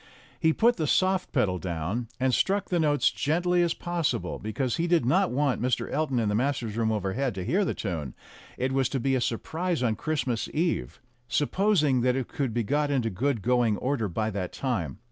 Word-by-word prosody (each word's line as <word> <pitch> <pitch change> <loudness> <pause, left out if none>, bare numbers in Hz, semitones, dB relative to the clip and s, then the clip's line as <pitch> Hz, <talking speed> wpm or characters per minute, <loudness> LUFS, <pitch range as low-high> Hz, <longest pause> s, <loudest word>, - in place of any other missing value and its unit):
He 160 - +4
put 235 +8 +3
the 155 -3 -1
soft 185 +3 +2
pedal 100 - +1
down, 90 +7 -3
and 130 0 +2
struck 200 +8 +1
the 175 - +1
notes 145 -2 +2
as - - +6
gently 175 +4 +1
as 170 -1 +1
possible, 165 - -2
because 115 +4 -2
he 170 +1 0
did 170 -7 +3
not 185 +9 +3
want 135 -2 0
Mr. 125 0 0
Elton 150 -3 0
in 115 -2 +1
the 105 - 0
masters' 120 -2 -1
room 115 -1 +1
overhead 110 +4 -1
to 95 -2 -4
hear 195 - +2
the - - -1
tune; 80 - -4 0.4
it 130 +1 -1
was 135 -2 +1
to 135 - -1
be 135 +2 +1
a 130 - +1
surprise 160 +7 -1
on 115 -3 +1
Christmas 140 -6 -2
Eve 170 +2 -1 0.3
supposing 150 - +2
that 125 +1 +2
it 130 -2 -2
could 135 -4 -2
be 120 +1 0
got 145 +6 0
into 125 -5 0
good 115 +2 -1
going 120 -3 +2
order 130 -3 -1
by 110 +4 -2
that 95 -3 -3
time. 100 - -2
130 Hz, 205 wpm, -27 LUFS, 110-155 Hz, 0.4 s, as